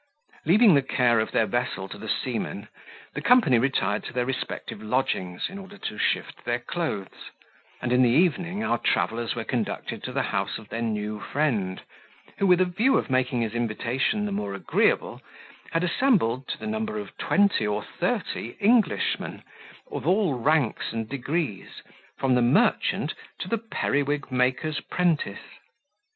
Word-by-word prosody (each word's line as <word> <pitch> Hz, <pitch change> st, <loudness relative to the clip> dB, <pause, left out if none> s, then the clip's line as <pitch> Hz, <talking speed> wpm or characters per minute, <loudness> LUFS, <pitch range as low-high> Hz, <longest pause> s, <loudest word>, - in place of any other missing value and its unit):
Leaving 205 Hz, +3 st, +7 dB
the 140 Hz, -, +5 dB
care 125 Hz, -3 st, +2 dB
of 110 Hz, -, 0 dB
their 110 Hz, -, +3 dB
vessel 120 Hz, -3 st, -2 dB
to -, -, -9 dB
the -, -, -7 dB
seamen, -, -, -2 dB, 0.5 s
the -, -, -4 dB
company 230 Hz, -, +5 dB
retired 110 Hz, -5 st, 0 dB
to -, -, -6 dB
their 125 Hz, -1 st, 0 dB
respective 125 Hz, -4 st, -4 dB
lodgings, 105 Hz, -6 st, -1 dB
in 195 Hz, +2 st, -8 dB
order 195 Hz, +1 st, -11 dB
to 105 Hz, -, -5 dB
shift -, -, -1 dB
their 120 Hz, 0 st, 0 dB
clothes; 120 Hz, -, -4 dB, 0.5 s
and 125 Hz, -1 st, +1 dB
in 125 Hz, -, +5 dB
the 125 Hz, -, +5 dB
evening 175 Hz, -, +2 dB
our 120 Hz, -, +1 dB
travellers 115 Hz, +1 st, 0 dB
were 115 Hz, -, -3 dB
conducted 115 Hz, -1 st, -3 dB
to -, -, -5 dB
the -, -, 0 dB
house -, -, -1 dB
of 110 Hz, -2 st, -13 dB
their 115 Hz, -, -3 dB
new 105 Hz, -2 st, -2 dB
friend, 105 Hz, -9 st, -1 dB, 0.6 s
who, 195 Hz, -, +3 dB
with 180 Hz, -1 st, +5 dB
a 185 Hz, -, +5 dB
view 215 Hz, +10 st, +2 dB
of -, -, -2 dB
making 130 Hz, -1 st, +1 dB
his 110 Hz, -2 st, -2 dB
invitation 120 Hz, -, 0 dB
the 205 Hz, -, -3 dB
more 100 Hz, -, -3 dB
agreeable, -, -, +1 dB, 0.5 s
had 165 Hz, +1 st, +1 dB
assembled, 170 Hz, -, +2 dB
to -, -, -3 dB
the -, -, -8 dB
number 220 Hz, 0 st, -2 dB
of 210 Hz, -, -7 dB
twenty 200 Hz, -, +3 dB
or 105 Hz, 0 st, -1 dB
thirty 115 Hz, -, -3 dB
Englishmen, 215 Hz, 0 st, +2 dB, 0.5 s
of -, -, -4 dB
all 185 Hz, -3 st, +3 dB
ranks 135 Hz, 0 st, +1 dB
and 115 Hz, -1 st, -4 dB
degrees, 140 Hz, -, -3 dB, 0.3 s
from 135 Hz, -1 st, +2 dB
the 125 Hz, -, +4 dB
merchant 135 Hz, -, +2 dB, 0.2 s
to -, -, -5 dB
the 230 Hz, -, 0 dB
periwig 145 Hz, -, -1 dB
maker's 130 Hz, +4 st, +1 dB
prentice. 165 Hz, -, -1 dB
130 Hz, 165 wpm, -26 LUFS, 115-180 Hz, 0.6 s, Leaving